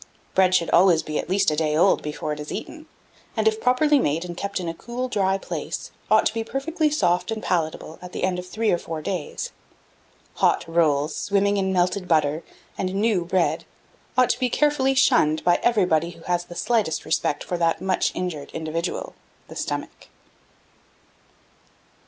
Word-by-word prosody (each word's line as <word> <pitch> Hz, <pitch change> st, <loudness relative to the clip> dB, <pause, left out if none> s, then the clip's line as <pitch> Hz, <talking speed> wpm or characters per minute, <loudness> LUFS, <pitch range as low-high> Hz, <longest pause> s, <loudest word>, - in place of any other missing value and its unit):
Bread 185 Hz, -1 st, +4 dB
should 170 Hz, -2 st, +1 dB
always 170 Hz, -2 st, +5 dB
be 155 Hz, -1 st, -3 dB
at -, -, -5 dB
least 195 Hz, -2 st, +3 dB
a -, -, 0 dB
day 155 Hz, -1 st, +1 dB
old 190 Hz, +4 st, +4 dB
before 150 Hz, 0 st, -4 dB
it 150 Hz, -, -7 dB
is 150 Hz, -, -7 dB
eaten; 315 Hz, -1 st, -7 dB, 0.5 s
and, -, -, +2 dB
if 440 Hz, 0 st, +1 dB
properly 290 Hz, +4 st, +4 dB
made, 160 Hz, -, 0 dB
and 175 Hz, -1 st, -6 dB
kept 200 Hz, +2 st, -3 dB
in 180 Hz, -, -4 dB
a 165 Hz, -, -2 dB
cool 240 Hz, +8 st, -5 dB
dry 195 Hz, -5 st, +1 dB
place, -, -, -5 dB, 0.2 s
ought 215 Hz, 0 st, +5 dB
to -, -, +1 dB
be 225 Hz, 0 st, -2 dB
perfectly 305 Hz, +6 st, -1 dB
soft 180 Hz, -, +1 dB
and 220 Hz, -1 st, -3 dB
palatable 160 Hz, -2 st, -2 dB
at 180 Hz, 0 st, -9 dB
the -, -, -5 dB
end 185 Hz, -1 st, +1 dB
of 180 Hz, -, -8 dB
three 220 Hz, +3 st, 0 dB
or 175 Hz, -, +1 dB
four 160 Hz, -2 st, -6 dB
days. -, -, -4 dB, 0.9 s
Hot -, -, +2 dB
rolls, 155 Hz, -3 st, +2 dB
swimming 200 Hz, 0 st, +1 dB
in 190 Hz, -1 st, 0 dB
melted 180 Hz, +1 st, +1 dB
butter, 155 Hz, -1 st, +2 dB, 0.4 s
and 185 Hz, 0 st, -2 dB
new 205 Hz, -3 st, +2 dB
bread, 180 Hz, 0 st, +1 dB, 0.5 s
ought 255 Hz, -1 st, +5 dB
to -, -, -3 dB
be 255 Hz, -1 st, +1 dB
carefully 270 Hz, 0 st, +2 dB
shunned 245 Hz, -, +3 dB
by 175 Hz, 0 st, +3 dB
everybody 180 Hz, -8 st, +2 dB
who 165 Hz, -1 st, -13 dB
has 175 Hz, -1 st, -1 dB
the 175 Hz, -, -11 dB
slightest 220 Hz, -5 st, 0 dB
respect 150 Hz, -2 st, 0 dB
for 180 Hz, -, -3 dB
that 165 Hz, -1 st, +1 dB
much 190 Hz, 0 st, 0 dB
injured 160 Hz, -6 st, -4 dB
individual 165 Hz, -, -3 dB, 0.4 s
the -, -, -10 dB
Stomach. -, -, -5 dB
180 Hz, 180 wpm, -24 LUFS, 165-225 Hz, 0.9 s, always